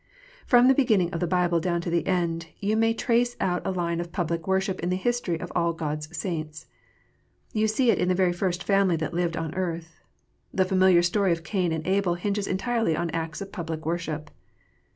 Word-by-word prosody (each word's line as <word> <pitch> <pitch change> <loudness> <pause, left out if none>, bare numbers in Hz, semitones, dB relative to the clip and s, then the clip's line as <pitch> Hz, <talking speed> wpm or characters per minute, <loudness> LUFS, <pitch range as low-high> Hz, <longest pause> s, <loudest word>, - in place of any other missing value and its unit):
From 245 0 +6
the 265 - +7
beginning 215 -10 +2
of 165 - -2
the 175 - 0
Bible 175 -1 +2
down 170 0 0
to 170 - -4
the 170 0 0
end, 170 -3 0
you 205 +2 0
may 225 +1 +3
trace 240 +1 +1
out 180 -1 0
a - - -2
line 170 -2 -1
of 170 0 -5
public 170 -2 -2
worship 190 0 0
in 175 - -2
the 180 - +1
history 190 -4 -1
of - - -6
all 170 -1 +2
God 155 -2 -3
s 155 +2 -9
saints. 155 -2 -4 0.9
You 220 0 +2
see 230 +3 +3
it - - 0
in 180 - +1
the 185 - +2
very 180 -1 +2
first 180 0 -2
family 195 -3 +3
that 155 0 -3
lived 170 -1 -1
on 160 -1 -3
earth. 170 -3 -4 0.5
The 185 - +2
familiar 185 -2 +4
story 190 +1 +2
of 165 -1 -1
Cain 180 0 0
and 160 -1 -3
Abel 190 -2 +1
hinges 200 +2 -2
entirely 225 -2 0
on 170 -1 -2
acts 160 -1 -4
of 195 0 -7
public 160 -3 -5
worship. 160 -2 -3
175 Hz, 215 wpm, -26 LUFS, 165-195 Hz, 0.9 s, the